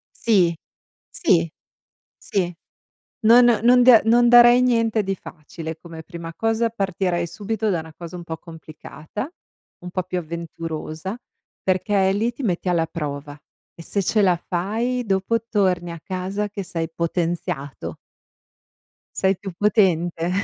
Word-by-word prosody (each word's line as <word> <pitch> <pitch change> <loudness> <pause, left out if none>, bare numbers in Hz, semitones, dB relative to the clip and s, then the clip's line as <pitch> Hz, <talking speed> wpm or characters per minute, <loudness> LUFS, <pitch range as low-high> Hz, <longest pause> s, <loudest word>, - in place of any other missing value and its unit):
Sì. 185 -7 +3 0.6
Sì. 85 0 +2 0.7
Sì. 180 -3 -2 0.7
Non 235 +3 +8 0.2
non 245 +1 +6
da 245 -3 +8
non 240 +2 +5
darei 240 +1 +8
niente 230 -3 +2
di 195 0 -2
facile 160 -2 -8
come 165 -1 -10
prima 170 -1 -8
cosa, 225 +2 0
partirei 190 -4 -1
subito 210 +5 -3
da 175 -4 0
una 160 0 -11
cosa 170 0 -8
un 175 - -8
po' 160 -1 -5
complicata, 160 - -9 0.5
un 180 - -7
po' 185 +1 -2
più 185 0 -3
avventurosa, 165 +2 -5 0.5
perché 190 +1 +2
lì 220 +4 0
ti 250 - -9
metti 185 -5 -1
alla 170 -2 +2
prova, 145 -2 -6 0.4
e 170 - -11
se 200 +4 -2
ce 210 +3 +2
la 180 -3 +4
fai 220 +9 -2
dopo 195 +2 +1
torni 185 -5 +1
a 170 - -9
casa 190 +3 -3
che 205 0 -5
sei 165 -2 -3
potenziato. 165 -4 -3 1.2
Sei 190 0 +2
più 195 -2 -7
potente. 175 -3 +1
185 Hz, 140 wpm, -22 LUFS, 170-215 Hz, 1.2 s, Non